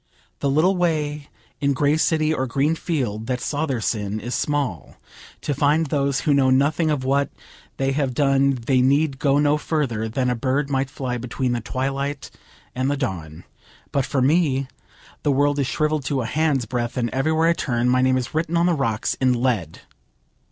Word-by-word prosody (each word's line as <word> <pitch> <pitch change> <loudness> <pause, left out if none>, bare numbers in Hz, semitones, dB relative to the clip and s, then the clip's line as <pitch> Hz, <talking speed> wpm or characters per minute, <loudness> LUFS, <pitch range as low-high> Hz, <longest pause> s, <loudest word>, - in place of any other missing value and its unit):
The 140 - 0
little 160 +8 +3
way 150 -4 -1 0.3
in 140 0 +1
grey 145 +2 +2
city 155 -1 +2
or 130 -3 -1
green 140 +5 +1
field 125 - -3
that 125 -1 -1
saw 150 +4 -2
their 130 -5 -1
sin 105 -2 -2
is 120 +3 -5
small; 145 -3 -2 0.5
to 145 - -1
find 145 +4 +2
those 140 -3 0
who 150 - +2
know 135 -2 +3
nothing 145 +5 +2
of 145 -4 0
what 140 +2 +1 0.5
they 135 0 0
have 135 -3 -1
done 135 -1 +3
they 130 -1 +3
need 140 +1 +2
go 140 -1 +2
no 145 +1 +3
further 125 -9 -1
than 125 +3 -1
a - - 0
bird 135 +4 -1
might 135 0 0
fly 130 -3 -4
between 125 +1 -2
the 120 -1 -1
twilight 135 +4 -3 0.4
and 130 +2 -1
the 145 - 0
dawn; 85 - -4 0.5
but 140 - +1
for 130 0 0
me 140 -2 +2 0.5
the 145 - +1
world 145 +1 +2
is 135 - +1
shrivelled 150 -2 0
to 135 -2 -1
a - - -4
handsbreadth, 125 -5 -1
and 120 -2 -1
everywhere 160 +5 +2
I - - +4
turn 120 -6 -1
my 130 +1 +3
name 130 0 +3
is 125 -1 -4
written 165 +2 0
on 170 - +3
the 175 - +3
rocks 115 -8 -1
in 130 -1 +4
lead. 115 - -1
135 Hz, 190 wpm, -22 LUFS, 125-150 Hz, 0.5 s, I